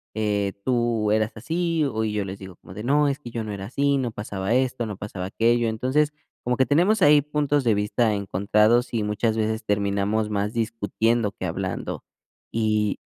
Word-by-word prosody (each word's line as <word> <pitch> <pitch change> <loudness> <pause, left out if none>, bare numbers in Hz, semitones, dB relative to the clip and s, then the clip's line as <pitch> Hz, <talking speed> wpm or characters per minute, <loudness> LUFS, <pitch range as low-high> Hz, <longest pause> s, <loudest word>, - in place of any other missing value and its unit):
eh, 105 -2 0
tú 120 -4 +1
eras 110 +1 +2
así", 165 +3 0
o 110 -5 -1
y 105 - -2
yo 105 -1 0
les 95 +1 -6
digo 95 -2 -10
como 90 - -13
de: 105 - -6
"No, 145 +3 +3
es 135 - -1
que 120 -5 -9
yo 115 -1 -3
no 110 - -5
era 95 -1 -6
así, 140 +2 +1
no 125 -3 -1
pasaba 105 0 -3
esto, 130 -2 0
no 105 -3 -6
pasaba 95 -3 -6
aquello". 115 +3 +2
Entonces, 135 +7 +1 0.3
como 125 0 0
que 130 - +4
tenemos 180 - +3
ahí 145 -2 +7
puntos 145 -1 0
de 115 - +4
vista 105 +2 +1
encontrados 105 +5 +2
y 110 -3 0
muchas 105 +2 0
veces 110 0 -1
terminamos 100 +1 0
más 105 +1 -1
discutiendo 115 0 0
que 100 -3 -6
hablando. 90 +1 -4 0.5
Y, 105 -2 0
110 Hz, 190 wpm, -24 LUFS, 105-125 Hz, 0.5 s, ahí